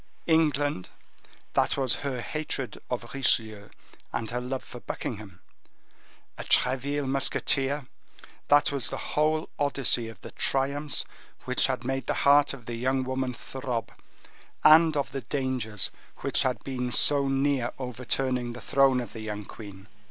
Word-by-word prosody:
England, 145 - +2 0.6
that - - +2
was 130 -3 +2
her 135 -4 -3
hatred 150 -3 -4
of 120 -1 -4
Richelieu 110 -6 +1 0.4
and 115 -1 -3
her 125 +1 -2
love 130 +1 -4
for 125 - -10
Buckingham; 105 -6 -6 1.0
a - - -4
Treville 140 +3 +1
musketeer, 135 +1 0 0.6
that 145 0 +5
was 140 -4 -1
the - - -4 0.2
whole 155 +1 +2
Odyssey 135 -5 +1
of 110 -4 -10
the - - -9
triumphs 140 +2 0 0.4
which 125 0 +2
had 130 -2 -2
made 135 +1 -2
the - - 0
heart 145 +1 +6
of 125 -4 -9
the 120 0 -4
young 130 +2 +1
woman 130 -1 -2
throb, 125 -3 -4 0.7
and 160 0 +7
of 140 - -1
the 135 0 -4
dangers 130 -8 -1 0.3
which 140 - +1
had 130 -2 0
been 125 -2 -3
so 140 +3 +6
near 135 -2 +1
overturning 125 -1 -2
the 120 - -8
throne 135 -2 +3
of 115 -4 -8
the 110 - -7
young 105 -1 -5
queen. 100 -2 -11
130 Hz, 145 wpm, -27 LUFS, 120-140 Hz, 1.0 s, and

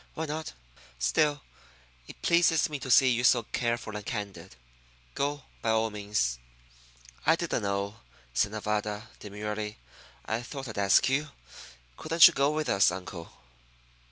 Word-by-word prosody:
Why 160 - -3
not? 155 +1 -5 0.4
Still, 140 - +1 0.6
it - - -13
pleases 170 -2 +3
me 145 - -3
to 130 - -7
see 130 +1 +6
you 120 0 +1
so 120 -1 +5
careful 115 -1 -2
and 105 - -5
candid. 100 - -6 0.6
Go, 145 0 -2 0.2
by 115 - -1
all 110 0 +2
means." 100 -13 -1 0.8
"I - - +4
didn't - - -2
know," 100 +1 -2 0.4
said 100 +11 +1
Nevada, 105 0 -3
demurely. 105 +1 -5 0.5
"I 110 +2 -2
thought 135 +2 -7
I'd 110 -3 -5
ask 100 -1 +4
you. 145 +3 0 0.7
Couldn't 165 +1 +7
you 170 - +1
go 140 -1 +2
with 155 0 -2
us, 100 0 +4
uncle?" 90 -2 -7
110 Hz, 145 wpm, -28 LUFS, 100-140 Hz, 0.8 s, Couldn't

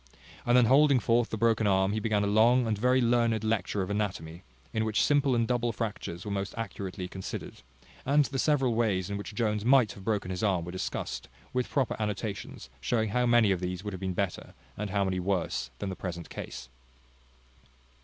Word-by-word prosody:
And 120 +1 +5
then 125 - +6
holding 140 +2 +5
forth 120 +1 +2
the 110 - -3
broken 110 -1 +2
arm, 95 0 +3
he 110 - 0
began 105 -1 +1
a - - +1
long 115 +5 +4
and 110 -1 0
very 125 +5 +2
learned 115 -2 +2
lecture 105 -2 0
of 95 - -4
anatomy, 90 -5 -3 0.3
in 110 - +1
which 110 -1 +1
simple 140 -3 +3
and 115 -1 +1
double 120 -1 0
fractures 105 -6 -5
were 105 - -4
most 100 0 -3
accurately 95 -4 -5
considered; 95 -8 -7 0.4
and 145 +2 +3
the 135 -1 -3
several 135 -5 +2
ways 100 -5 0
in 100 - -2
which 100 +1 -7
Jones 105 -3 0
might 125 -2 +5
have 100 - -11
broken 100 -3 -1
his 90 - -3
arm 95 -6 +1
were 90 - -6
discussed, 95 -8 -4 0.3
with 125 -1 -1
proper 135 -4 0
annotations 105 - -4
showing 110 - 0
how 125 +4 +1
many 120 -4 +5
of 95 - +1
these 90 +1 -4
would 105 -1 -5
have 95 - -6
been 95 -1 -2
better, 100 -1 -3 0.2
and 105 0 -4
how 100 +1 +1
many 95 -1 -1
worse 85 -10 -1
than 100 - -4
the 95 - -4
present 85 -3 -6
case. 65 - -7
105 Hz, 205 wpm, -29 LUFS, 95-120 Hz, 0.4 s, then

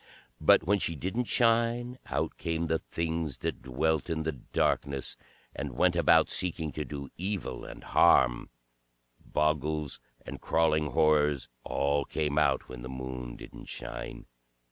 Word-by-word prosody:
But - - +5
when 100 +4 +2
she 85 - -1
didn't 95 - -2
shine, 120 +2 +2
out - - -2
came 85 0 -1
the 80 0 +1
Things 80 -3 -3
that - - -3
dwelt 75 +6 0
in 80 -1 -1
the 80 - 0
darkness 70 0 -1 0.4
and 70 -4 -5
went 90 -1 +3
about 85 -4 +5
seeking 80 -4 0
to 75 - -3
do 70 -2 -7
evil 95 +1 -3
and - - -10
harm; - - +4 0.7
Bogles 75 -1 -1 0.3
and - - -7
Crawling 80 -2 +2
Horrors, 75 0 +2
all 70 +1 +1
came 75 +1 0
out 70 -3 +2
when 65 -1 -8
the 65 - -7
Moon 65 -2 -6
didn't - - -11
shine. - - -7
75 Hz, 145 wpm, -29 LUFS, 70-85 Hz, 0.7 s, But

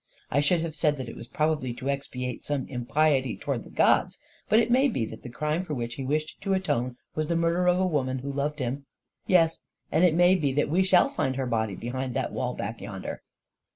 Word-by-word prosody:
I 145 - +3
should 160 +4 +3
have 165 -1 -3
said 150 -1 +1
that 130 -2 -5
it 115 - -8
was 115 - -9
prob 155 -1 +1
ably 130 -3 -4
to 130 - -6
expiate 125 -3 -3
some 145 -3 -2
impiety 135 0 +1
towards - - -3
the - - -12
gods; - - +2 0.3
but 215 - +5
it 235 +1 +3
may 260 +3 +5
be 130 - -1
that 110 0 -9
the - - -8
crime 150 +7 -1
for 155 -5 -4
which 120 -1 -3
he 135 - -5
wished 155 +3 -2
to 195 -1 +1
atone 125 -10 -1 0.2
was 155 0 -1
the 170 - 0
murder 170 +2 +2
of 180 0 +4
a 190 - +3
woman 135 -7 0
who 140 +2 -5
loved 145 +2 -1
him; 135 +1 -3 0.4
yes 165 -3 +4 0.2
— - - -46
and 160 +4 +3
it 175 -3 +5
may 175 +2 +6
be 150 -7 +1
that 145 +1 +1
we 175 +5 +3
shall 185 -1 +5
find 130 0 -1
her 135 0 -1
body 110 -4 -1
be 120 - -6
hind 130 0 -3
that - - -1
wall - - -2
back - - -5
yonder." - - -6
145 Hz, 245 wpm, -27 LUFS, 130-170 Hz, 0.4 s, may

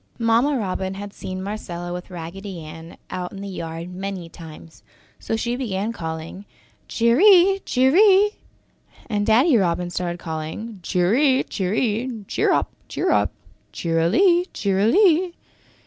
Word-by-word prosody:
Mamma 235 +5 +2
Robin 190 -3 -3
had 205 +1 -8
seen 185 0 -6
Marcella 175 -4 -5
with 180 +1 -7
Raggedy 180 +1 -7
Ann 160 +2 -11
out 180 -1 -4
in 195 - -8
the 200 - -6
yard 170 -1 -6
many 190 -2 -5
times, 165 -1 -13 0.4
so - - -3
she 235 +2 -2
began 220 -3 -2
calling 160 +2 -6 0.4
"Cheery! 365 - +5
Cheery!" 380 +10 +5 0.8
and 205 -3 -1
Daddy 250 +7 +5
Robin 175 -2 0
started 175 -1 -3
calling 165 +7 -6
"Cheery! 240 - +2
Cheery! 220 +4 -2
Cheer - - +1
up! - - +1 0.2
Cheer - - -1
up! - - +2 0.4
Cheerily 220 - +2
Cheerily! 325 - +3
200 Hz, 125 wpm, -22 LUFS, 175-250 Hz, 0.8 s, Cheery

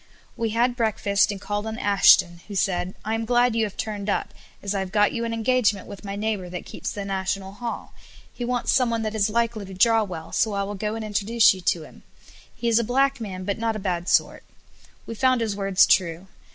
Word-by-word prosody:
We 230 -1 -1
had 240 +3 +1
breakfast 210 -4 +1
and 200 - -6
called 205 +2 -3
on 220 0 -4
Ashton, 195 -5 +4
who 205 - -7
said, 185 -1 -1
"I 220 - -1
am 225 0 -1
glad 240 0 +2
you 225 -1 +2
have 205 - -8
turned 210 -2 -4
up, - - -1 0.3
as 200 0 -2
I 200 - -1
have 190 -1 -4
got 205 0 +3
you 235 - -2
an 230 - -3
engagement 225 -3 +1
with 200 -1 -10
my 200 -1 -5
neighbour 205 -3 -2
that 180 0 -6
keeps - - -6
the 200 -1 -5
National 190 0 -3
Hall, 230 +3 -6 0.4
he 245 - -6
wants 245 0 0
someone 235 -3 +1
that 215 0 -3
is 215 -1 +1
likely 230 -1 -1
to 190 -1 -9
draw 225 +4 +4
well, 170 -5 -7
so 215 -2 +1
I 200 0 -1
will 200 +1 -4
go 210 +2 -3
and 225 -1 -5
introduce 215 +2 +3
you 185 - -9
to 175 -2 0
him; - - -15 0.5
he 235 - -3
is 230 0 +4
a - - +1
black 270 +2 +1
man, 185 -4 -5
but 200 +3 -3
not 225 -1 -1
a 205 -2 -4
bad 175 0 -2
sort." - - +2 0.6
We - - -6
found 255 +2 +2
his 220 -3 -1
words 195 -1 +3
true. 170 -1 +1
210 Hz, 230 wpm, -24 LUFS, 195-230 Hz, 0.6 s, Ashton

